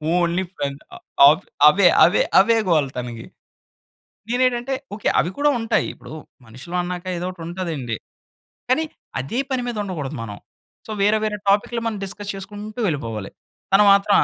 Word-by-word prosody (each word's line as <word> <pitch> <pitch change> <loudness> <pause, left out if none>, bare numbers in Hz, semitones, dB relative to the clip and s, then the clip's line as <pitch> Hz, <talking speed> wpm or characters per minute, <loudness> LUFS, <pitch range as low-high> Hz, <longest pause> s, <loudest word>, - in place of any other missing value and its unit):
Only 175 +1 +1
friend 140 0 -4 0.4
ఆహ్, 150 +3 +5 0.2
అవే 185 +5 +6 0.2
అవే 175 - +3 0.2
అవే 225 +4 +4
గోల 155 -4 +3
తనకి. 120 -2 -6 1.1
నేనేంటంటే 250 +1 +1 0.2
ఓకే 205 - -2
అవి 170 - -1
కూడా 295 +1 +3
ఉంటాయి. 225 0 0
ఇప్పుడు - - -13 0.3
మనుషులు 130 +10 -7
అన్నాక 175 0 -5
ఏదో 175 - -3
ఒకటి 180 -3 -10
ఉంటదండి. 165 -10 -4 0.7
కానీ 260 +5 +3 0.4
అదే 135 - -3
పని 260 -2 -1
మీద 235 - -4
ఉండకూడదు 155 -7 -5
మనం. 105 -2 -7 0.5
సో, - - -6
వేరే 210 +2 +4
వేరే 210 -1 -1
టాపిక్‌లు 210 +4 +1
మనం 220 -2 -3
డిస్కస్ 200 +1 -6
చేసుకుంటూ 205 +3 -8
వెళ్ళిపోవాలి. 115 - -3 0.4
తను 200 +2 +7
మాత్రం 200 +1 +4
185 Hz, 150 wpm, -21 LUFS, 150-215 Hz, 1.1 s, తను